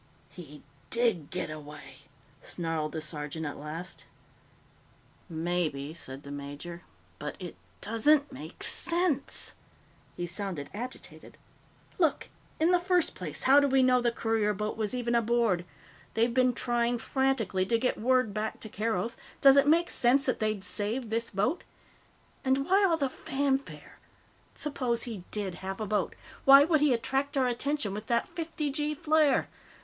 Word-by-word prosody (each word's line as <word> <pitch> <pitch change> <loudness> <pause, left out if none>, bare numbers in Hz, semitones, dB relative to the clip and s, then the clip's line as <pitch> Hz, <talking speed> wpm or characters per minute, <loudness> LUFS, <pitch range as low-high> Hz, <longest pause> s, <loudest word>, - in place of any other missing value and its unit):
"He 150 -4 -12 0.3
did 230 -11 +1
get - - -3
away!" 145 -3 -10 0.4
snarled 165 -3 -3
the 160 - -3
sergeant 155 +1 -5
at 145 - -5
last. 160 +5 -7 1.2
"Maybe," 160 -3 -2
said 135 -4 -9
the 140 - -9
major. 145 +5 -7 0.4
"But - - -5
it - - -7 0.3
doesn't 285 +6 +2
make - - -9
sense." 340 -4 -2 0.6
He 175 - -2
sounded 175 -4 -5
agitated. 245 +5 -8 0.6
"Look. 325 -4 +1 0.3
In 325 +3 +4
the 360 - +5
first 355 -1 +1
place, - - -5
how 275 +2 +7
do 285 - +3
we 265 -1 +4
know 250 -1 +4
the 240 -1 +2
courier 225 -2 0
boat 210 +2 -3
was 220 +2 -2
even 240 -1 -1
aboard? 230 -6 +2 0.5
They've 230 +1 +2
been 255 0 +3
trying 240 0 0
frantically 230 -6 0
to 230 - +3
get 250 -2 -1
word 255 -3 +2
back 215 +1 -3
to 220 - -5
Keroth; 220 +1 -2 0.2
does 275 -1 +8
it 280 0 +5
make 335 +3 +4
sense 265 +3 +3
that 255 - 0
they'd 215 -3 -1
save 215 +5 -1
this 230 +1 -1
boat? 210 - 0 0.8
And 270 0 +2
why 390 +4 +4
all 330 - +2
the 280 -3 +1
fanfare? 270 +1 -3 0.6
Suppose 255 -6 -1
he 215 -7 -6
did 200 -3 -3
have 190 +1 -5
a 215 - -2
boat? 205 -3 -1 0.3
Why 275 +1 +9
would 315 0 +3
he 295 -1 +4
attract 270 +4 0
our 265 - +3
attention 250 -2 -1
with 210 +2 -6
that 235 -1 +1
fifty 320 -3 -3
gee 300 +1 -1
flare? 300 -2 +3
230 Hz, 155 wpm, -29 LUFS, 185-275 Hz, 1.2 s, Why